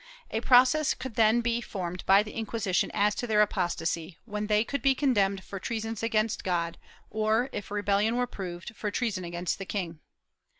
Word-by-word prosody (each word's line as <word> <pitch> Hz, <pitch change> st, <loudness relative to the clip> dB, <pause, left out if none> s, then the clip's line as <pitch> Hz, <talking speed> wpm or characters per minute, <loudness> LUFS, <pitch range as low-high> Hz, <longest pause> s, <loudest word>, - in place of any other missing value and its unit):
A 220 Hz, -, -1 dB
process 260 Hz, +5 st, +5 dB
could 260 Hz, -3 st, -7 dB
then 225 Hz, +1 st, +4 dB
be 235 Hz, 0 st, 0 dB
formed 180 Hz, -5 st, -5 dB
by 195 Hz, +2 st, +6 dB
the 210 Hz, -, -9 dB
Inquisition 220 Hz, -4 st, -1 dB
as 205 Hz, +1 st, +2 dB
to 245 Hz, -, -4 dB
their 210 Hz, -1 st, +5 dB
apostasy, 170 Hz, -3 st, -2 dB
when 210 Hz, -2 st, -3 dB
they 210 Hz, 0 st, +3 dB
could 280 Hz, +4 st, -3 dB
be 270 Hz, -1 st, +4 dB
condemned 200 Hz, -9 st, +1 dB
for 195 Hz, -, -7 dB
treason 225 Hz, +2 st, -3 dB
against 225 Hz, -1 st, 0 dB
God, 170 Hz, -2 st, -1 dB, 0.3 s
or, 220 Hz, +4 st, +1 dB
if 205 Hz, -, -5 dB
rebellion 205 Hz, +2 st, +1 dB
were 245 Hz, 0 st, +1 dB
proved, 185 Hz, 0 st, -7 dB
for 210 Hz, -, -3 dB
treason 210 Hz, -4 st, -2 dB
against 175 Hz, 0 st, -3 dB
the 195 Hz, -, -5 dB
king. 170 Hz, -6 st, -4 dB
210 Hz, 180 wpm, -28 LUFS, 190-230 Hz, 0.3 s, by